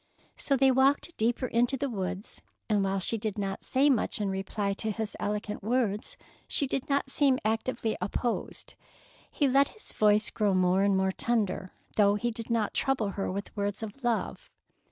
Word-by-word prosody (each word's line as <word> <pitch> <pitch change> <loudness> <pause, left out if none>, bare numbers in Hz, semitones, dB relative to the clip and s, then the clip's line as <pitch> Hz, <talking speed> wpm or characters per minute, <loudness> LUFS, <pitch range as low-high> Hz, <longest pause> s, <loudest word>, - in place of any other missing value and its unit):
So 275 - +1
they 270 0 +5
walked 265 +2 +3
the 345 - -12
deeper 235 +3 0
into 245 +2 +1
the 280 - -1
woods, 190 -3 -4 0.3
and 210 -3 +2
while 195 0 0
she 215 +4 0
did 215 -1 -3
not 195 -1 -3
say 270 +3 +2
much 255 -7 +1
in 200 -2 0
reply 200 +1 -2
to 220 +2 -3
his 215 0 -3
eloquent 210 0 -3
words, 215 -2 -1 0.3
she 280 - +1
did 270 +1 -3
not 280 -1 +1
seem 275 -2 +3
actively 220 0 0
opposed. 235 +3 -2 0.6
He 285 - +1
let 275 +1 +4
his 435 - -10
voice 210 +1 +3
grow 205 -3 +1
more 185 +1 +3
and 200 -1 +3
more 190 0 +2
tender, 200 -4 -1 0.2
though 205 -1 +5
he 240 +3 -1
did 230 0 -7
not 230 -3 0
trouble 260 -6 0
her 195 -1 -3
with 200 +2 -5
words 205 +1 -2
of 220 +5 -8
love. 240 -2 -1
220 Hz, 185 wpm, -29 LUFS, 200-255 Hz, 0.6 s, they